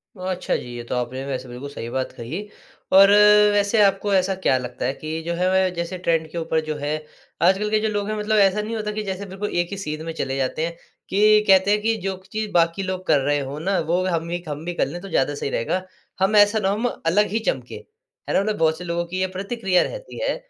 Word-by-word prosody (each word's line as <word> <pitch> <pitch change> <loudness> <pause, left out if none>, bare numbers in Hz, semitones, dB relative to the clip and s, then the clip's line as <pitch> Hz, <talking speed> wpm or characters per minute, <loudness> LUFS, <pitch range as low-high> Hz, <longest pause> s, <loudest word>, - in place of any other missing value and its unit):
ओ, - - -17
अच्छा 185 -1 -1
जी, 120 -1 -6
ये 120 - -6
तो - - -1
आपने 125 +2 -3
वैसे 130 -2 -4
बिल्कुल 125 +3 -8
सही 120 -4 -7
बात 130 +2 -2
कही 160 - -6 0.5
और 195 +1 +9 0.4
वैसे 205 +2 +3
आपको 200 +1 +2
ऐसा 190 0 +2
क्या 185 -8 +2
लगता 125 -1 -5
है 130 - 0
कि 155 +3 -5
जो 170 +1 -2
है 180 +2 +1
वह 190 0 +3
जैसे 170 +2 -3
ट्रेंड 165 -3 0
के - - -6
ऊपर 160 -1 0
जो 155 0 -3
है, 145 0 -3 0.5
आजकल 190 +4 +3
के 215 0 +2
जो 220 - 0
लोग 205 -1 -2
है 215 - -2
मतलब 215 +1 +1
ऐसा 200 +1 +4
नहीं 220 +2 -4
होता 210 -1 -3
कि 215 0 -3
जैसे 195 0 -4
बिल्कुल 195 +2 -5
एक 175 - -13
ही 200 - -4
सीध 155 -5 -5
में 165 - -4
चले 135 -4 -3
जाते 135 +4 -1
हैं, 170 0 -5 0.3
कि 210 +2 +5
कहते 190 0 +5
हैं 210 0 +2
कि 225 +1 +1
जो 195 -1 -1 0.2
चीज़ 215 0 -2
बाकी 170 +2 +2
लोग 185 0 -4
कर 145 - +4
रहे 145 +2 +1
हो 140 +1 -5
ना 190 +4 0
वो 175 +3 +1
हम 170 -2 -1
ही 175 0 -3
हम 150 0 -5
भी 175 - -3
कर - - +1
लें 165 +6 -6
तो 195 - -9
ज़्यादा 145 -3 +1
सही 140 - -3
रहेगा। 135 +9 -1 0.4
हम 195 +3 +2
ऐसा 205 +1 +5
ना 195 - +1
हो 200 - +1
हम 230 +4 0 0.2
अलग 205 +6 +3
ही 220 - 0
चमके, - - -2 0.5
है - - 0
ना? - - +4
मतलब 210 +1 -1
बहुत 160 -1 +2
से 180 - -8
लोग 170 0 -3
की 185 +1 -3
ये 185 - +1
प्रतिक्रिया 195 -2 +1
रहती - - -7
है, - - 0
185 Hz, 260 wpm, -22 LUFS, 155-205 Hz, 0.5 s, और